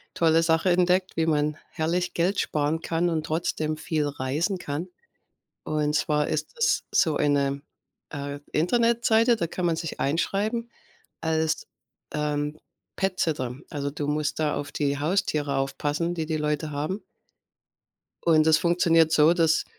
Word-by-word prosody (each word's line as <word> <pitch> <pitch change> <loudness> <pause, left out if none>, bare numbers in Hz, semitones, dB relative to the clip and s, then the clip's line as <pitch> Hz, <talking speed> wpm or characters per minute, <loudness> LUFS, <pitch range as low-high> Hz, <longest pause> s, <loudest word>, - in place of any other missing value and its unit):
tolle 165 0 +4
Sache 165 +2 +2
entdeckt, 180 +1 +2
wie 165 0 +1
man 150 -1 +1
herrlich 175 +2 -1
Geld 180 +4 +1
sparen 150 +2 0
kann 170 +1 0
und 155 -1 -1
trotzdem 155 -1 -1
viel 155 -2 -1
reisen 145 +8 -1
kann. 155 +2 -4 0.8
Und 150 -1 -1
zwar 150 0 +1
ist 155 0 -3
das 465 - +2
so 160 - +2
eine, 140 -1 +1 0.5
äh, 145 -1 -5
Internetseite, 230 +5 +3
da 170 - -1
kann 180 +2 -4
man 165 -1 +1
sich 165 -1 -5
einschreiben 210 - -1 0.5
als, 160 0 0 0.5
ähm, 150 0 -1 0.4
Pet-Sitter. 160 -10 -1 0.2
Also, 140 -3 -3
du 145 -1 -4
musst 150 0 -1
da 150 -1 +1
auf 145 - -5
die 140 -1 0
Haustiere 150 -4 0
aufpassen, 145 +5 -1
die 160 -2 -3
die 160 0 -1
Leute 150 0 -1
haben. 155 +8 -3 1.2
Und 160 -2 +5
das 160 -1 +6
funktioniert 165 -2 +3
so, 155 +1 +6
dass 165 -2 +2
160 Hz, 145 wpm, -26 LUFS, 150-175 Hz, 1.2 s, das